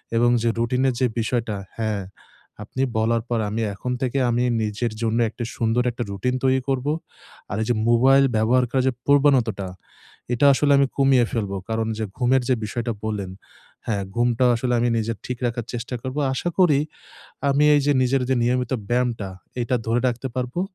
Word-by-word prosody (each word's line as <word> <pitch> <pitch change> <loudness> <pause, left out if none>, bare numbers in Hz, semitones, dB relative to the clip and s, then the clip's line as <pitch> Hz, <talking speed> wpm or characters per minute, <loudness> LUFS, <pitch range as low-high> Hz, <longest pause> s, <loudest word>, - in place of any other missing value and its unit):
এবং 120 +1 +4
যে 115 - +2
রুটিনের 125 +2 +1
যে 130 - +3
বিষয়টা 115 -1 -1 0.2
হ্যাঁ 110 -3 -1 0.6
আপনি 130 +5 -5 0.2
বলার 115 +1 +2
পর 120 -1 0
আমি 110 +2 -2
এখন 125 +6 -5
থেকে 130 +1 -1
আমি 120 +1 +1 0.2
নিজের 110 +2 -2
জন্য 115 0 0
একটা 120 +2 -6
সুন্দর 115 +2 +1
একটা 120 +1 -4
রুটিন 125 +6 -1
তৈরি 130 0 +3
করব। 135 +1 -1 0.6
আর 95 - -2
এই - - 0
যে 120 - +3
মোবাইল 135 +4 +5
ব্যবহার 120 +4 +3
করা 130 - +2
যে - - +3
প্রবণতাটা 130 -9 +3 0.7
এটা 130 +4 +2
আসলে 145 +1 +2
আমি 140 -1 +4
কমিয়ে 135 -3 +4
ফেলবো। 100 -4 -2
কারণ 110 0 -1
যে 110 - -2
ঘুমের 130 +1 +3
যে 130 - +4
বিষয়টা 120 +2 -3
বললেন 100 -4 -3 0.6
হ্যাঁ 100 -3 -1
ঘুমটা 120 +1 +2
আসলে 125 +1 -1
আমি 120 +1 +2
নিজে 115 +1 -1
ঠিক 125 -1 -4
রাখার 120 -1 -2
চেষ্টা 120 +1 -4
করব। 130 +2 -5 0.2
আশা 175 +6 -2
করি 155 -7 +5 0.7
আমি 140 +2 +3
এই 145 - +4
যে 145 - +4
নিজের 130 +1 +1
যে 130 - +3
নিয়মিত 125 +1 0 0.2
ব্যায়ামটা 120 -4 0 0.3
এইটা 125 +1 0
ধরে 115 +2 +1
রাখতে 120 +2 -3
পারবো। 125 +7 -2
120 Hz, 180 wpm, -23 LUFS, 115-130 Hz, 0.7 s, মোবাইল